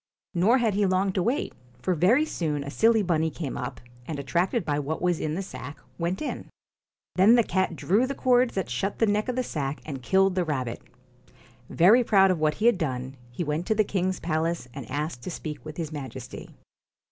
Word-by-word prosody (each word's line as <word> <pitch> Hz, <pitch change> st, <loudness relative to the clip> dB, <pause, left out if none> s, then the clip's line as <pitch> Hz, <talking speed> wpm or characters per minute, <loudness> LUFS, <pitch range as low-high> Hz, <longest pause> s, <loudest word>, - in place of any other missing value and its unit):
Nor 200 Hz, +8 st, +4 dB
had 230 Hz, -4 st, +1 dB
he 200 Hz, 0 st, +2 dB
long 185 Hz, +1 st, +1 dB
to 185 Hz, -, 0 dB
wait, 245 Hz, -, -1 dB, 0.3 s
for 185 Hz, -, +1 dB
very 205 Hz, -, +4 dB
soon 150 Hz, -, -2 dB
a 140 Hz, -, -6 dB
silly 225 Hz, +4 st, +3 dB
bunny 160 Hz, -3 st, +1 dB
came 155 Hz, -3 st, -5 dB
up, 125 Hz, +1 st, -5 dB, 0.3 s
and 155 Hz, -, -4 dB
attracted 170 Hz, +6 st, 0 dB
by 145 Hz, -1 st, 0 dB
what 150 Hz, +2 st, -3 dB
was 175 Hz, -2 st, +1 dB
in 155 Hz, 0 st, -2 dB
the 195 Hz, -, -3 dB
sack, 145 Hz, -6 st, -8 dB, 0.2 s
went 175 Hz, -, -1 dB
in. -, -, -5 dB, 0.7 s
Then 205 Hz, +6 st, +7 dB
the 235 Hz, -, +5 dB
cat 190 Hz, -3 st, 0 dB
drew 210 Hz, +10 st, +2 dB
the 275 Hz, -, -4 dB
cords 250 Hz, -2 st, +3 dB
that 190 Hz, -3 st, -1 dB
shut 190 Hz, +12 st, -2 dB
the 225 Hz, -, +3 dB
neck 210 Hz, +3 st, 0 dB
of 250 Hz, -, -1 dB
the 255 Hz, -, 0 dB
sack 145 Hz, -, -3 dB
and 140 Hz, -4 st, -6 dB
killed 190 Hz, +7 st, +3 dB
the 185 Hz, -1 st, +1 dB
rabbit. 130 Hz, -7 st, -3 dB, 0.9 s
Very 210 Hz, +9 st, +5 dB
proud 195 Hz, -4 st, +5 dB
of 180 Hz, -, -1 dB
what 155 Hz, 0 st, +1 dB
he 215 Hz, -, -2 dB
had 240 Hz, -5 st, +4 dB
done, 130 Hz, -3 st, -3 dB
he 125 Hz, +8 st, -4 dB
went 155 Hz, +3 st, -2 dB
to 220 Hz, -, +2 dB
the 215 Hz, -, +4 dB
king's 185 Hz, -2 st, -1 dB
palace, 165 Hz, -2 st, -1 dB
and 135 Hz, -5 st, -8 dB
asked 145 Hz, -1 st, -3 dB
to 125 Hz, -, -6 dB
speak 155 Hz, -3 st, -6 dB
with 155 Hz, -1 st, -9 dB
his 165 Hz, -3 st, -4 dB
Majesty. 130 Hz, -4 st, -7 dB
175 Hz, 215 wpm, -26 LUFS, 150-200 Hz, 0.9 s, Then